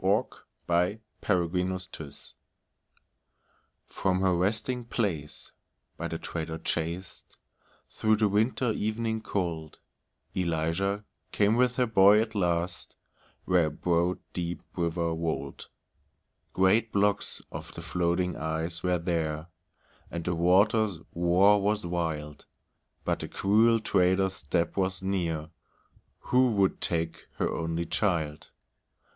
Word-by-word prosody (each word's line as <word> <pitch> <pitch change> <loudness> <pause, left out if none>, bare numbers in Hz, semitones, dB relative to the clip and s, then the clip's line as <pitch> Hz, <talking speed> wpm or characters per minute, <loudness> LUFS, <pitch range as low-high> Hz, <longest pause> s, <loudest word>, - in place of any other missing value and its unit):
ELIZA - - +3 0.9
CROSSING 90 0 +1
THE 90 0 -9
RIVER 75 -3 -7 1.7
From 95 -1 0
her 95 -1 +3
resting 110 +7 0
place 95 - -3 0.4
by - - -4
the - - -4
trader 80 -1 -4
chased, 85 +2 -4 0.5
Through 110 0 +2
the 105 0 +2
winter 110 +4 +1
evening 110 +1 -1
cold, 85 -7 -3 0.5
Eliza 90 +4 0 0.3
came 105 +2 +3
with 125 0 +3
her 125 - +3
boy 105 -2 +6
at 110 0 -1
last, 85 -3 -1 0.5
Where 90 -3 +3
a - - -1
broad 85 +3 +1 0.2
deep 85 -1 -3
river 85 -1 0
rolled. 80 0 -3 0.8
Great 105 +4 +3
blocks 100 0 +1
of - - -7
the - - -7
floating 90 0 0
ice 80 +2 -3
were 90 -1 +1
there, 80 -2 -2 0.6
And 85 -1 -5
the 90 - 0
water's 95 +4 +3 0.2
roar 90 +4 +4
was 105 0 0
wild, 80 -4 -3 0.6
But - - 0
the - - -4
cruel 110 +3 +3
trader's 95 -2 +2
step 85 -1 -1
was 95 -1 -1
near, 85 -5 -1 0.7
Who 125 0 +3
would 100 -2 +2
take 85 -1 -2
her - - 0
only 85 +1 -2
child. 80 -6 -1
90 Hz, 115 wpm, -28 LUFS, 85-105 Hz, 1.7 s, boy